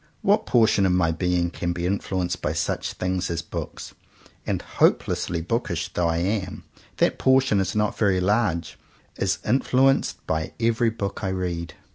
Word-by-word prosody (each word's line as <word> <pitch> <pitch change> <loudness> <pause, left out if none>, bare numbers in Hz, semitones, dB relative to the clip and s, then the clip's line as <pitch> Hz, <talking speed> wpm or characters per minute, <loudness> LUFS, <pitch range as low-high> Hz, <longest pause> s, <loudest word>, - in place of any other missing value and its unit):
What 205 +2 +3
portion 110 -5 +4
of - - +2
my 85 -2 +2
being 85 +1 0
can 85 0 -2
be 85 0 -3
influenced 90 -2 -2
by 75 - -1
such 80 - -2
things 90 -1 -2
as 85 -2 -2
books - - -7 0.3
— - - -27
and - - 0
hopelessly 85 -1 +1
bookish 85 -4 -2
though 90 -1 +1
I 80 0 0
am, 95 +2 -2 0.3
that - - +2
portion 130 -5 +3
is 95 +1 -1
not 105 -1 0
very 100 -4 +3
large 95 -3 0 0.2
— - - -35
is - - +1
influenced 135 +3 +2
by 80 0 -2
every 115 0 +2
book 110 -2 -4
I 95 - 0
read. 90 -3 -3
95 Hz, 170 wpm, -24 LUFS, 85-110 Hz, 0.3 s, portion